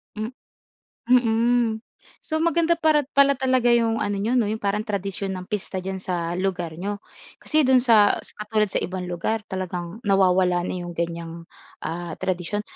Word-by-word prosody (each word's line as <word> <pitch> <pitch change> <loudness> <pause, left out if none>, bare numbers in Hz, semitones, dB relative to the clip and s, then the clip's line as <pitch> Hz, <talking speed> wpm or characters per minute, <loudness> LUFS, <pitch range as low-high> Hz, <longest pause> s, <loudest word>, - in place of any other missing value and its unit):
Hmm 215 +2 -3 0.8
Mm. 235 -1 +3 0.4
So, 315 0 -2
maganda 335 0 +3
para 310 -4 +2
pala 280 -1 +5
talaga 255 -2 +2
'yong 230 -1 +2
ano 205 0 -1
n'yo 225 +5 0
'no 235 -4 +3
yung 220 - -2
parang 205 +1 0
tradisyon 195 -1 -3
ng 180 - -8
pista 200 -2 -4
dyan 190 0 -5
sa 170 -2 -2
lugar 180 -3 -2
n'yo. 205 +2 -3 0.4
Kasi 310 -1 +1
do'n 260 -1 +5
sa 220 -5 +5
sa - - -12
katulad 215 0 +1
sa - - -1
ibang 180 0 -4
lugar 180 +5 -2
talagang 185 +2 -5
nawawala 185 -3 +3
na - - -3
'yong 175 - -6
ganyang 170 0 -4 0.4
ah, 170 0 -4
tradisyon. 185 +3 -2
205 Hz, 165 wpm, -24 LUFS, 180-240 Hz, 0.8 s, pala